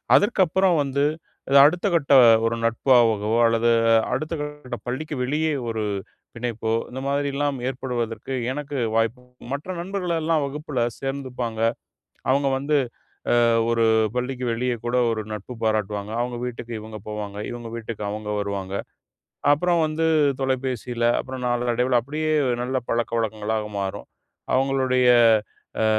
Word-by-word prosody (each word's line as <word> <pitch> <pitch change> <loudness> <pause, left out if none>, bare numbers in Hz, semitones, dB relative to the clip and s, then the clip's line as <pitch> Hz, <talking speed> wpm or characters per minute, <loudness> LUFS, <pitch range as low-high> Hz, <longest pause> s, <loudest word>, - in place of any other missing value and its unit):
அதற்கப்பறம் 190 -4 +3
வந்து 140 +1 -1 0.6
அடுத்த 175 +7 +3
கட்ட 145 -3 +2 0.3
ஒரு 115 +1 +1
நட்பாகவோ 115 -3 +3
அல்லது 115 +1 +3 0.4
அடுத்தகட்ட 150 -1 -4
பள்ளிக்கு 150 +5 -3
வெளியே 155 +4 0 0.2
ஒரு 110 -1 -2 0.5
பிணைப்போ, 115 -1 -3 0.2
இந்த 130 +2 -6
மாரிலாம் 140 0 0
ஏற்படுவதற்கு 125 -1 -3 0.2
எனக்கு 145 0 -4 0.2
வாய்ப்பு 115 +2 +1 0.3
மற்ற 145 +6 -4
நண்பர்களெல்லாம் 170 -4 -1
வகுப்புல 145 -2 -3 0.2
சேர்ந்துப்பாங்க. 130 -4 -4 0.7
அவுங்க 140 +1 +2
வந்து 145 +2 +1 0.7
அ - - +5 0.3
ஒரு 115 -1 +2 0.3
பள்ளிக்கு 125 0 -2
வெளியே 125 +2 -1
கூட 120 +1 -1 0.2
ஒரு 110 -1 -2
நட்பு 105 +4 -7
பாராட்டுவாங்க. 105 -1 -1
அவுங்க 120 0 -3
வீட்டுக்கு 120 -1 -6
இவுங்க 110 0 -8
போவாங்க. 105 -1 -5
இவுங்க 120 -1 -7
வீட்டுக்கு 110 -2 -6
அவுங்க 105 0 -4
வருவாங்க. 100 -1 -4 0.8
அப்புறம் 170 +2 +2
வந்து 160 +1 0 0.3
தொலைபேசியில, 125 -3 -1 0.2
அப்புறம் 130 -1 -7
நாளடைவில 120 +1 +1
அப்பிடியே 155 +5 -2 0.3
நல்ல 130 +1 -1
பழக்கவழக்கங்களாக 110 -2 -1
மாறும். 95 -1 -4 0.5
அவுங்களுடைய 130 -1 +2 0.7
அ - - +3
125 Hz, 115 wpm, -23 LUFS, 115-145 Hz, 0.8 s, அ